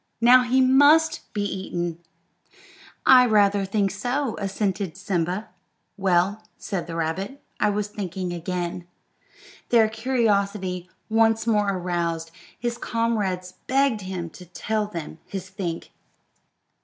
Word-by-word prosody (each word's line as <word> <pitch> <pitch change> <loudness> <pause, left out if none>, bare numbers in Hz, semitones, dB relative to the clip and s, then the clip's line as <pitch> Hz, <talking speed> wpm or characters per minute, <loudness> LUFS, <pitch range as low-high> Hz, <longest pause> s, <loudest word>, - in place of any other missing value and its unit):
Now 245 +2 +7
he 250 +2 +2
must 290 +5 +4
be 205 - -2
eaten." 175 -4 -3 1.1
"I 255 -1 +8
rather 205 -2 +3
think 200 0 0
so," 245 +5 -2
assented 195 -2 -2
Simba. 185 +1 -2 0.5
"Well," 190 +2 +1 0.2
said 195 -5 -4
the 165 - -6
rabbit, 185 - -3 0.2
"I 210 - +3
was 205 0 -1
thinking 185 -3 -4
again." 175 0 -4 0.8
Their 230 -2 +5
curiosity 200 -6 0 0.2
once 225 0 +3
more 210 -3 +2
aroused, 170 -3 -2 0.3
his 240 0 -3
comrades 205 -6 -1
begged 265 -4 +2
him 185 -3 -5
to 180 - -12
tell 210 +4 -2
them 165 -5 -7
his 190 -1 -6
think. 185 -4 -5
200 Hz, 120 wpm, -24 LUFS, 180-225 Hz, 1.1 s, I